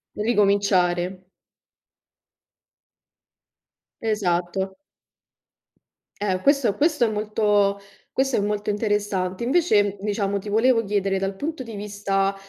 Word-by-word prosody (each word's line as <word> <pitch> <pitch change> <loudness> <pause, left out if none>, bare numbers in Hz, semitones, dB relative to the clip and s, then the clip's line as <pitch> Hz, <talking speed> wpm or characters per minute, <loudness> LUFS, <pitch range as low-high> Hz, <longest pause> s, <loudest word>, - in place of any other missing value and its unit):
Ricominciare. 195 -4 +1 2.8
Esatto. 190 -2 -1 1.4
Eh, 190 -3 0
questo 275 -7 +3
questo 295 -2 +2
è - - 0
molto 210 -1 +1 0.3
questo 265 -1 +1
è - - +2
molto 210 0 -1
interessante. 205 -2 -1
Invece, 215 - +2
diciamo, 200 -1 -1
ti 205 +1 -8
volevo 230 +2 +3
chiedere, 195 -2 0
dal 195 0 -2
punto 310 +5 -4
di 230 -4 -8
vista, 200 -1 -1
205 Hz, 95 wpm, -23 LUFS, 195-220 Hz, 2.8 s, questo